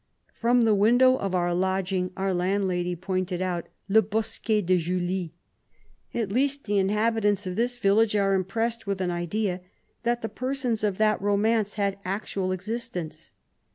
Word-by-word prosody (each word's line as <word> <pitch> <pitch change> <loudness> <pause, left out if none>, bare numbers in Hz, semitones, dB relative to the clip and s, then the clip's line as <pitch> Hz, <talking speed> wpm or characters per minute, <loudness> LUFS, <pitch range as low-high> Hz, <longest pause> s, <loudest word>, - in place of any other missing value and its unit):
From 240 +1 +2
the 220 -1 +4
window 245 +6 +5
of 195 -5 -2
our 175 -1 +1
lodging 190 0 0
^our 190 -1 0
landlady 180 -1 0
pointed 185 0 -2
out 180 -2 -2
" - - -47
le 215 +2 +5
bosquet 215 0 -1
de 180 +1 +3
Julie." 175 0 -2 0.8
At 220 -5 -1
least 275 +4 +1
the 205 - -3
inha 210 +4 +2
bitants 205 -2 +1
of 180 -1 -4
this 245 +3 0
village 210 0 +3
are 195 -1 +2
impressed 225 +4 -1
with 200 -1 -1
an 180 -1 -1
idea, 180 +2 -2 0.4
that 240 0 -1
the - - 0
persons 255 -3 -2
of 205 -3 0
that 215 -2 +2
romance 205 +1 +1
had 200 -2 -1
actual 195 -1 -2
existence. 185 -3 -5
200 Hz, 160 wpm, -26 LUFS, 185-225 Hz, 0.8 s, window